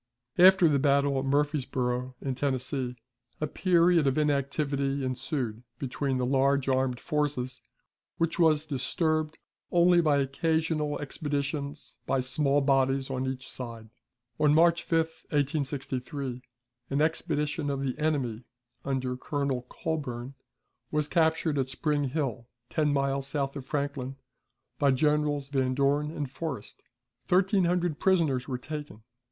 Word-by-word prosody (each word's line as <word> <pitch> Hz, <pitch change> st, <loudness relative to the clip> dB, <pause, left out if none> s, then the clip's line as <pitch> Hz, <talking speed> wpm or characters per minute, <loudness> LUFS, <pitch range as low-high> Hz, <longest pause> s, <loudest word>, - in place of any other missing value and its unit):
After 185 Hz, -1 st, +8 dB
the 145 Hz, -3 st, +3 dB
battle 140 Hz, 0 st, +3 dB
at 135 Hz, -, -3 dB
Murfreesboro, 130 Hz, -3 st, 0 dB
in 135 Hz, -, -2 dB
Tennessee, 130 Hz, -1 st, -2 dB, 0.4 s
a 155 Hz, -, 0 dB
period 170 Hz, -1 st, +3 dB
of 135 Hz, -, +1 dB
inactivity 140 Hz, -1 st, 0 dB
ensued 130 Hz, -3 st, -2 dB, 0.2 s
between 135 Hz, 0 st, -2 dB
the 125 Hz, -, 0 dB
large 135 Hz, +1 st, +2 dB
armed 130 Hz, -2 st, +1 dB
forces, 145 Hz, -5 st, -2 dB, 0.6 s
which 165 Hz, 0 st, 0 dB
was 155 Hz, -2 st, +4 dB
disturbed 155 Hz, +2 st, -1 dB, 0.3 s
only 175 Hz, 0 st, +5 dB
by 150 Hz, -3 st, +3 dB
occasional 155 Hz, +2 st, 0 dB
expeditions 145 Hz, 0 st, -4 dB
by 135 Hz, -, +2 dB
small 140 Hz, +2 st, +2 dB
bodies 135 Hz, -1 st, +2 dB
on 130 Hz, 0 st, -2 dB
each 130 Hz, 0 st, -4 dB
side. 115 Hz, -3 st, -7 dB, 0.5 s
On 150 Hz, -1 st, +4 dB
March 170 Hz, +1 st, +5 dB
5, 165 Hz, -, 0 dB, 0.3 s
1863, 140 Hz, -3 st, -2 dB, 0.5 s
an 140 Hz, -, 0 dB
expedition 150 Hz, -1 st, 0 dB
of 140 Hz, -1 st, -2 dB
the 130 Hz, -2 st, -1 dB
enemy, 135 Hz, -7 st, -1 dB, 0.4 s
under 130 Hz, -2 st, -1 dB
Colonel 135 Hz, -2 st, -2 dB
Colburn, 135 Hz, -6 st, -4 dB, 0.6 s
was 150 Hz, -1 st, 0 dB
captured 160 Hz, -2 st, +2 dB
at 130 Hz, -1 st, 0 dB
Spring 145 Hz, +1 st, 0 dB
Hill, 130 Hz, -4 st, -2 dB, 0.2 s
ten 150 Hz, -2 st, +2 dB
miles 140 Hz, -1 st, 0 dB
south 140 Hz, 0 st, -2 dB
of 135 Hz, -2 st, -7 dB
Franklin, 140 Hz, -2 st, -2 dB, 0.6 s
by 140 Hz, -, +4 dB
Generals 145 Hz, 0 st, +1 dB
Van 130 Hz, -2 st, 0 dB
Dorn 145 Hz, +2 st, +2 dB
and 150 Hz, -2 st, -4 dB
Forrest. 140 Hz, -7 st, -6 dB, 0.5 s
Thirteen 190 Hz, +1 st, +3 dB
hundred 175 Hz, -3 st, 0 dB
prisoners 155 Hz, -9 st, +2 dB
were 130 Hz, -3 st, -2 dB
taken. 145 Hz, -5 st, -7 dB
140 Hz, 130 wpm, -28 LUFS, 130-155 Hz, 0.6 s, After